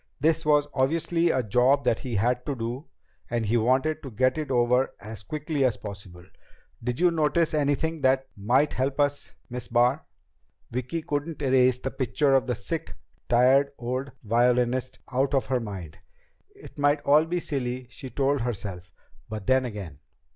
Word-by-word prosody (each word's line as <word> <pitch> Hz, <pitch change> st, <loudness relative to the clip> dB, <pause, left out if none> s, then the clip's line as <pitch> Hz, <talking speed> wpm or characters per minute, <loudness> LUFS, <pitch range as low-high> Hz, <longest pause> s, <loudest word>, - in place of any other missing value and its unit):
This 155 Hz, +1 st, +1 dB
was 150 Hz, -1 st, +4 dB
obviously 165 Hz, +5 st, +1 dB
a 130 Hz, -5 st, +1 dB
job 125 Hz, +6 st, +3 dB
that 115 Hz, -, +1 dB
he 125 Hz, -4 st, -4 dB
had 120 Hz, +5 st, +1 dB
to 140 Hz, -, -1 dB
do, 120 Hz, +5 st, -5 dB, 0.4 s
and 115 Hz, -1 st, -1 dB
he 110 Hz, +3 st, +1 dB
wanted 130 Hz, +7 st, +2 dB
to 135 Hz, -, -7 dB
get 130 Hz, +3 st, +1 dB
it 150 Hz, -2 st, -4 dB
over 125 Hz, +1 st, +2 dB
as 110 Hz, -1 st, -8 dB
quickly 150 Hz, -, -2 dB
as 125 Hz, -5 st, +2 dB
possible. 100 Hz, -4 st, -9 dB, 0.6 s
"Did 125 Hz, +1 st, -2 dB
you 175 Hz, 0 st, +4 dB
notice 160 Hz, +1 st, +1 dB
anything 150 Hz, +2 st, 0 dB
that 130 Hz, 0 st, +2 dB
might 125 Hz, +9 st, +2 dB
help 135 Hz, +2 st, -1 dB
us, 145 Hz, 0 st, 0 dB
Miss 125 Hz, -1 st, -6 dB
Barr?" 125 Hz, +5 st, +2 dB, 0.7 s
Vicki 130 Hz, +7 st, -3 dB
couldn't 150 Hz, 0 st, -3 dB
erase 130 Hz, -2 st, +4 dB
the 135 Hz, +1 st, -4 dB
picture 140 Hz, +1 st, +1 dB
of 130 Hz, -1 st, +3 dB
the 125 Hz, -, 0 dB
sick, 120 Hz, -, -4 dB, 0.3 s
tired 130 Hz, +4 st, +4 dB
old 130 Hz, +3 st, -3 dB
violinist 125 Hz, +3 st, +1 dB
out 135 Hz, +2 st, +1 dB
of 135 Hz, -, +1 dB
her 130 Hz, -1 st, 0 dB
mind. 95 Hz, -8 st, -7 dB, 0.6 s
It 405 Hz, -, -14 dB
might 145 Hz, +1 st, +3 dB
all 150 Hz, +3 st, +4 dB
be 175 Hz, +1 st, -1 dB
silly, 130 Hz, -5 st, -3 dB
she 130 Hz, -, -8 dB
told 140 Hz, 0 st, 0 dB
herself. 95 Hz, -7 st, -5 dB, 0.4 s
But 110 Hz, -2 st, -6 dB
then 130 Hz, +2 st, +3 dB
again 100 Hz, -, -7 dB
130 Hz, 170 wpm, -26 LUFS, 120-145 Hz, 0.7 s, was